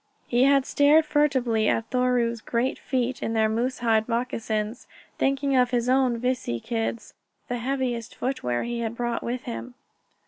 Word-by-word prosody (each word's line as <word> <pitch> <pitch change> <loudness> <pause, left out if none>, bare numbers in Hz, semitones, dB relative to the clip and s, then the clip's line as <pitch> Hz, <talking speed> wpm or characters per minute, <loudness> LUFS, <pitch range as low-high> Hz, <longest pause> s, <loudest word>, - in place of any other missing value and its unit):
He 245 +2 +3
had 275 -1 +4
stared 295 +3 +4
furtively 260 -8 +2
at 225 - -1
Thoreau's 245 -2 +1
great 240 +4 -1
feet 255 -1 -2
in 225 - -2
their 220 -1 +3
moose 240 +4 -1
hide 220 0 +2
moccasins, 230 -2 -2 0.3
thinking 275 0 +1
of 250 -1 +4
his 245 -1 0
own 255 -2 +3
vici 250 - -1
kids, 225 - -3 0.4
the 245 0 -2
heaviest 245 -2 -2
footwear 125 - -2
he 240 0 -3
had 230 0 -3
brought 240 -1 -2
with 245 +1 -3
him. 115 +2 -6
240 Hz, 160 wpm, -25 LUFS, 225-260 Hz, 0.4 s, had